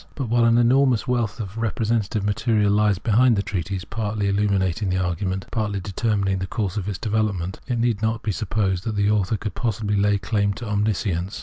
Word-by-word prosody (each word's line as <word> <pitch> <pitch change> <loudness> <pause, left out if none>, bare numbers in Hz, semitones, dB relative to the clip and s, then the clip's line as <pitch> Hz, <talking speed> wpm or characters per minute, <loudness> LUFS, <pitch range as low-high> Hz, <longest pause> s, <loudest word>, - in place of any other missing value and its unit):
But 135 -6 -3
while 120 0 +3
an 115 0 +4
enormous 125 0 +3
wealth 120 -6 -1
of 105 +1 -5
representative 110 -1 -1
material 105 0 +1
lies 105 -1 +3
behind 115 +4 +3
the 100 - 0
treatise, 95 -1 -3
partly 105 -2 -2
illuminating 100 -1 +1
the 90 - 0
argument, 95 +1 -2
partly 105 -3 -1
determining 100 0 -1
the 95 - -3
course 100 -4 -2
of 105 -1 -3
its 100 - -3
develop 110 -1 0
ment, 90 +1 -5
it 125 -2 -1
need 115 -3 0
not 110 0 -1
be 110 - 0
supposed 100 -3 -1
that 110 - -2
the 100 0 +2
author 105 +1 +1
could 105 0 -5
possibly 105 -3 -1
lay 100 0 +3
claim 100 0 0
to 115 +3 -7
omniscience. 100 -3 -1
105 Hz, 200 wpm, -23 LUFS, 100-110 Hz, -, an